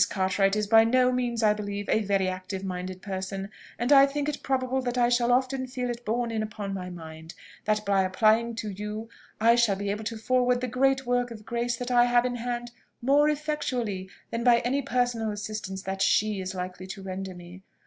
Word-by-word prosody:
Cartwright 195 Hz, +1 st, +1 dB
is 210 Hz, 0 st, 0 dB
by 225 Hz, +2 st, +6 dB
no 250 Hz, +2 st, +3 dB
means, 240 Hz, -2 st, -1 dB
I 210 Hz, -1 st, +5 dB
believe, 205 Hz, -1 st, -5 dB
a 220 Hz, -, +2 dB
very 195 Hz, -2 st, +1 dB
active 185 Hz, +1 st, -4 dB
minded 185 Hz, 0 st, -5 dB
person; 195 Hz, 0 st, -4 dB, 0.3 s
and 240 Hz, +4 st, -1 dB
I 275 Hz, -1 st, +8 dB
think 290 Hz, +1 st, -2 dB
it 295 Hz, -1 st, -3 dB
probable 265 Hz, 0 st, 0 dB
that 250 Hz, -1 st, -3 dB
I 240 Hz, -1 st, +4 dB
shall 240 Hz, 0 st, +2 dB
often 260 Hz, +1 st, +1 dB
feel 250 Hz, -1 st, -3 dB
it 240 Hz, 0 st, -7 dB
borne 235 Hz, +1 st, -1 dB
in 220 Hz, -1 st, -1 dB
upon 210 Hz, -2 st, -5 dB
my 185 Hz, -1 st, -5 dB
mind, 160 Hz, -1 st, -10 dB, 0.3 s
that 215 Hz, 0 st, 0 dB
by 195 Hz, -1 st, +3 dB
applying 220 Hz, +5 st, +2 dB
to 215 Hz, -2 st, -4 dB
you 210 Hz, +3 st, -6 dB, 0.3 s
I 230 Hz, +2 st, +5 dB
shall 235 Hz, -4 st, +3 dB
be 200 Hz, +1 st, -2 dB
able 210 Hz, +2 st, -4 dB
to 225 Hz, +1 st, -3 dB
forward 250 Hz, +2 st, +2 dB
the 255 Hz, -, -1 dB
great 265 Hz, +2 st, +1 dB
work 245 Hz, 0 st, +1 dB
of 215 Hz, -2 st, -10 dB
grace 235 Hz, 0 st, -1 dB
that 245 Hz, +1 st, -4 dB
I 240 Hz, 0 st, +5 dB
have 245 Hz, 0 st, +3 dB
in 245 Hz, -1 st, -2 dB
hand 240 Hz, 0 st, -4 dB, 0.3 s
more 285 Hz, +4 st, +4 dB
effectually 255 Hz, -10 st, -2 dB, 0.2 s
than 230 Hz, 0 st, -2 dB
by 235 Hz, -1 st, +5 dB
any 265 Hz, +4 st, 0 dB
personal 245 Hz, -4 st, 0 dB
assistance 205 Hz, -2 st, -5 dB
that 195 Hz, 0 st, -4 dB
she 210 Hz, -1 st, +2 dB
is 185 Hz, 0 st, -5 dB
likely 185 Hz, 0 st, -5 dB
to 195 Hz, 0 st, -8 dB
render 190 Hz, 0 st, -5 dB
me. 175 Hz, +1 st, -11 dB
225 Hz, 210 wpm, -27 LUFS, 195-245 Hz, 0.3 s, I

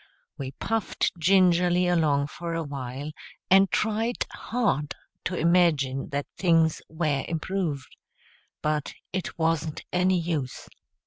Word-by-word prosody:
We 135 Hz, -2 st, -5 dB
puffed 225 Hz, +8 st, -1 dB
gingerly 180 Hz, 0 st, +4 dB
along 155 Hz, -5 st, +2 dB
for 170 Hz, +3 st, -5 dB
a 165 Hz, -, -1 dB
while, 140 Hz, 0 st, -5 dB, 0.4 s
and 195 Hz, 0 st, +7 dB
tried 220 Hz, +5 st, 0 dB
hard 205 Hz, -, -1 dB, 0.3 s
to 185 Hz, -, -1 dB
imagine 155 Hz, -6 st, +2 dB
that 140 Hz, 0 st, -2 dB
things 165 Hz, -3 st, +3 dB
were 155 Hz, -4 st, 0 dB
improved. 165 Hz, -5 st, -3 dB, 0.7 s
But 150 Hz, -1 st, -1 dB, 0.2 s
it 185 Hz, -1 st, -3 dB
wasn't 160 Hz, -2 st, 0 dB
any 180 Hz, 0 st, +3 dB
use. 160 Hz, -7 st, -3 dB
165 Hz, 115 wpm, -26 LUFS, 145-180 Hz, 0.7 s, and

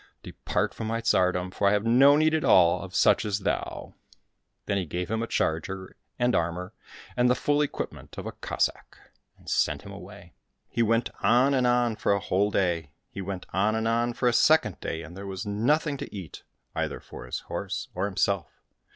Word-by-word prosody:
Depart -, -, -2 dB
from 110 Hz, -, -5 dB
my 115 Hz, +1 st, -1 dB
tsardom, 90 Hz, -5 st, +1 dB
for 100 Hz, -, +1 dB
I 100 Hz, -, +4 dB
have 105 Hz, +1 st, +1 dB
no 135 Hz, +5 st, +6 dB
need 155 Hz, +1 st, +3 dB
at 160 Hz, -, +1 dB
all 85 Hz, -2 st, +5 dB
of -, -, -9 dB
such -, -, +4 dB
as 105 Hz, -1 st, -2 dB
thou." 95 Hz, -, -3 dB, 0.7 s
Then 100 Hz, -, 0 dB
he 95 Hz, -, -2 dB
gave 90 Hz, +5 st, -4 dB
him 110 Hz, 0 st, 0 dB
a 115 Hz, -, -2 dB
charger 95 Hz, +3 st, -2 dB, 0.2 s
and 120 Hz, 0 st, +2 dB
armour, 90 Hz, +3 st, -1 dB, 0.4 s
and 125 Hz, 0 st, +3 dB
the 125 Hz, -, +4 dB
full 145 Hz, +3 st, +1 dB
equipment 145 Hz, -, -5 dB
of -, -, -6 dB
a -, -, -4 dB
Cossack, -, -, -3 dB, 0.4 s
and -, -, -22 dB
sent -, -, +1 dB
him -, -, -10 dB
away. -, -, -12 dB, 0.4 s
He 115 Hz, -, 0 dB
went 115 Hz, +1 st, +2 dB
on 130 Hz, +4 st, +4 dB
and 130 Hz, -2 st, +2 dB
on 120 Hz, -2 st, +2 dB
for -, -, +2 dB
a 100 Hz, -, +1 dB
whole 100 Hz, +2 st, +1 dB
day, 85 Hz, -6 st, 0 dB, 0.2 s
he 100 Hz, -, -6 dB
went 95 Hz, -1 st, -5 dB
on 100 Hz, +4 st, +2 dB
and 110 Hz, 0 st, 0 dB
on 120 Hz, +1 st, +1 dB
for 125 Hz, -, 0 dB
a 120 Hz, -, +3 dB
second 135 Hz, -, +4 dB
day, 80 Hz, 0 st, -4 dB
and 80 Hz, +3 st, -11 dB
there 100 Hz, +1 st, -7 dB
was 95 Hz, +1 st, -5 dB
nothing 140 Hz, +9 st, +1 dB
to -, -, -7 dB
eat, 95 Hz, -8 st, -8 dB, 0.3 s
either -, -, -2 dB
for -, -, -11 dB
his -, -, -4 dB
horse -, -, -4 dB
or 90 Hz, +2 st, -1 dB
himself. 100 Hz, -1 st, 0 dB
105 Hz, 205 wpm, -27 LUFS, 95-120 Hz, 0.7 s, no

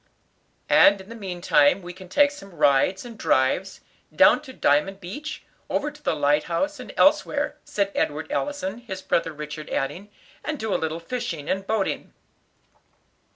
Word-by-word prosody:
"And 200 Hz, 0 st, +6 dB
in 190 Hz, +2 st, -12 dB
the 230 Hz, -, -8 dB
meantime 180 Hz, -5 st, +2 dB
we 175 Hz, 0 st, -7 dB
can 185 Hz, 0 st, -13 dB
take 285 Hz, +6 st, +4 dB
some 200 Hz, -11 st, -12 dB
rides 145 Hz, -, +3 dB
and 230 Hz, -2 st, -10 dB
drives, 155 Hz, +9 st, +1 dB, 0.3 s
down -, -, +5 dB
to 285 Hz, -3 st, -11 dB
Diamond 195 Hz, -, +1 dB
Beach, 290 Hz, -, -7 dB, 0.3 s
over 295 Hz, +1 st, -1 dB
to 295 Hz, +1 st, -17 dB
the 225 Hz, -, 0 dB
light 145 Hz, 0 st, +2 dB
house, 290 Hz, -, -1 dB
and -, -, -8 dB
elsewhere," -, -, +3 dB
said 200 Hz, -1 st, -1 dB
Edward 150 Hz, +2 st, -2 dB
Allison, 240 Hz, -8 st, -2 dB
his 190 Hz, -6 st, -7 dB
brother 165 Hz, -1 st, 0 dB
Richard 150 Hz, 0 st, -7 dB
adding, 180 Hz, +9 st, -3 dB, 0.3 s
"and 305 Hz, 0 st, -3 dB
do 220 Hz, -5 st, -2 dB
a -, -, 0 dB
little 160 Hz, +1 st, -2 dB
fishing 170 Hz, -, -4 dB
and 195 Hz, 0 st, -2 dB
boating." 215 Hz, -3 st, -1 dB
190 Hz, 160 wpm, -24 LUFS, 160-230 Hz, 0.3 s, And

